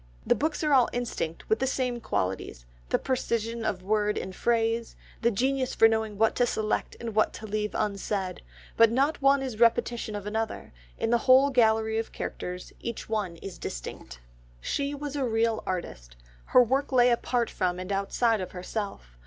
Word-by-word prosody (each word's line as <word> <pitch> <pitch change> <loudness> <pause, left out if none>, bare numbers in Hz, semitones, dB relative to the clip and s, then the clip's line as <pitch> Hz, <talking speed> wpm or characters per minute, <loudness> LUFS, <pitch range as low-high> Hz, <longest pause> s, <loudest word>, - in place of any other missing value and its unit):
The - - +4
books 310 +2 -1
are 300 -1 +2
all 255 -3 +5
instinct 230 -9 -3
with 440 - +2
the 265 - +1
same 250 -2 -1
qualities, 90 - -3 0.2
the - - +3
precision 235 -3 -2
of 200 -4 -2
word 210 +1 +1
and 190 - -5
phrase, 230 +1 0 0.3
the 235 - +4
genius 260 +4 0
for 225 - +7
knowing 220 -2 -1
what 225 +1 +3
to 245 - +3
select 215 -2 -1
and 230 -2 -5
what 215 +1 +2
to 220 - -8
leave 210 0 -2
unsaid, 200 -2 -2 0.3
but 230 0 +6
not 275 +6 +1
one 275 0 +4
is 260 -3 -3
a - - -11
repetition 235 -1 +2
of 205 -1 -5
another, 220 - -3 0.2
in 225 - -1
the 240 - +4
whole 270 +2 +7
gallery 220 -3 +3
of 225 - -4
characters 180 0 -6
each 235 -2 -6
one 210 -6 -1
is 190 -3 -7
distinct. 60 +1 -7 0.4
She 280 - -2
was 290 0 -5
a 280 - 0
real 225 -2 +1
artist. 60 - -5 0.3
Her 250 - +6
work 270 +5 0
lay 250 -1 +5
apart 235 0 0
from 180 -1 -1
and 185 +2 -5
outside 205 +3 +1
of 185 - -6
herself. 180 - -6
225 Hz, 185 wpm, -27 LUFS, 200-245 Hz, 0.4 s, for